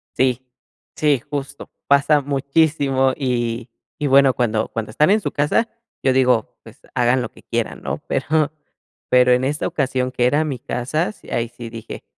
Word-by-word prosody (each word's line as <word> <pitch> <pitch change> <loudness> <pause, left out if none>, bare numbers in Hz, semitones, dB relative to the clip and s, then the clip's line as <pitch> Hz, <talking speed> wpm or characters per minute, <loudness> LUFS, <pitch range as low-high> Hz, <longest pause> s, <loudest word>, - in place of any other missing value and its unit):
Sí. 130 -1 +1 0.5
Sí, 145 -5 +2
justo, 140 -2 -6 0.2
pasa 140 +1 +4
muchísimo, 140 -1 +1
y 120 -3 -2 0.3
y 150 - -1
bueno, 135 -1 +5
cuando 110 -3 0
cuando 110 -1 -4
están 150 +8 +3
en 210 +2 +4
su - - -3
casa, 150 +10 +1 0.4
yo 130 - +3
digo, 125 -3 +2
pues, 115 +4 -15
hagan 125 0 +2
lo 115 - -6
que - - -18
quieran, - - -3
¿no? - - -3
Pero 155 0 0 0.6
pero 125 0 +5
en 125 +1 +3
esta 145 +3 -1
ocasión 130 -6 -1
que 125 -1 +1
era 145 +5 +2
mi 140 -5 -4
casa, 130 - -2
sí, - - -17
ahí 115 0 -1
sí 120 -1 -9
dije, 115 0 -8
130 Hz, 170 wpm, -20 LUFS, 125-145 Hz, 0.6 s, bueno